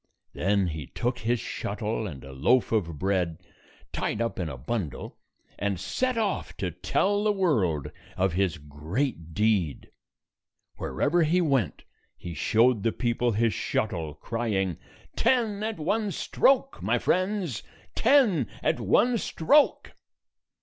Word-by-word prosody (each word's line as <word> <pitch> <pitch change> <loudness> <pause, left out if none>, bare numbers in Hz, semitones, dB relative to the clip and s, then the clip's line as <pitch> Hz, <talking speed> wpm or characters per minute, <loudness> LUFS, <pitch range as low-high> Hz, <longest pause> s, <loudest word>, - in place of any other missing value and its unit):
Then 95 +6 +1
he 75 -3 -6
took 120 +1 -2
his 120 +2 0
shuttle 110 +2 -3
and 70 -8 -8
a 70 - -10
loaf 115 - +2
of 85 -8 0
bread 90 -2 0 0.6
tied 105 - -2
up 115 -3 -2
in 85 -3 -2
a 70 - -6
bundle, 80 - -4 0.4
and 100 -3 -1
set 250 - -1
off 215 -3 -2
to - - -2
tell 205 +1 0
the 215 - +3
world 95 - +1 0.3
of 95 -1 +1
his 95 -2 +1
great 80 - -4
deed. 105 - 0 0.9
Wherever 170 +4 +1
he 165 +3 +3
went, 135 - 0 0.3
he 85 - -7
showed 115 +5 +3
the 115 - +1
people 120 0 0
his 110 +1 +2
shuttle, 85 -9 -2
crying, 95 -2 -2 0.4
"Ten 230 -4 +2
at 220 0 -2
one 205 +7 0
stroke, 275 +7 +2
my - - +1
friends! 185 - 0 0.3
Ten 215 - +4 0.2
at - - +1
one 230 - +3
stroke!" 285 - +2
115 Hz, 135 wpm, -27 LUFS, -, 0.9 s, Ten